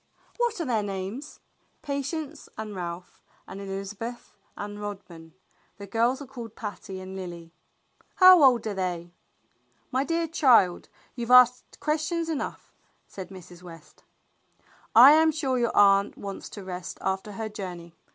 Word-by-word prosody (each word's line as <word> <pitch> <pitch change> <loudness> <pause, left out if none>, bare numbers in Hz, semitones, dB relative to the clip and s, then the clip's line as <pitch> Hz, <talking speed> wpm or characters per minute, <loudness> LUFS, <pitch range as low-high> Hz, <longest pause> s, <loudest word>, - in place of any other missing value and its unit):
"What 475 -4 0
are 335 - -2
their 235 -5 0
names?" 200 +8 -6 0.4
"Patience 285 +2 -4
and 215 -1 -6
Ralph 175 0 -7 0.3
and 195 - -8
Elizabeth 195 +5 -6 0.2
and 205 0 -6
Rodman. 175 -6 -9 0.4
The 200 - -8
girls 235 +6 0
are - - -10
called 240 -4 -9
Patty 205 -3 -7
and 185 0 -8
Lily." 170 -3 -8 0.6
"How 370 -2 +8
old 250 -5 +5
are 215 - -2
they?" 175 -2 -4 0.8
"My 260 +2 +1
dear 330 +2 -1
child, 250 - +3 0.2
you've 240 -2 -5
asked 250 0 +5
questions 320 +2 -1
enough," 310 -3 -5 0.3
said 185 -2 -9
Mrs. 180 -2 -13
West. 165 -3 -14 0.9
"I 250 +5 +10
am 315 +1 +5
sure 270 -5 -1
your 235 -1 -1
aunt 200 0 +4
wants 200 -1 -7
to 205 - -9
rest 180 -1 -7
after 190 +2 -3
her 220 +2 -4
joucney. 180 -5 -8
210 Hz, 140 wpm, -26 LUFS, 190-270 Hz, 0.9 s, I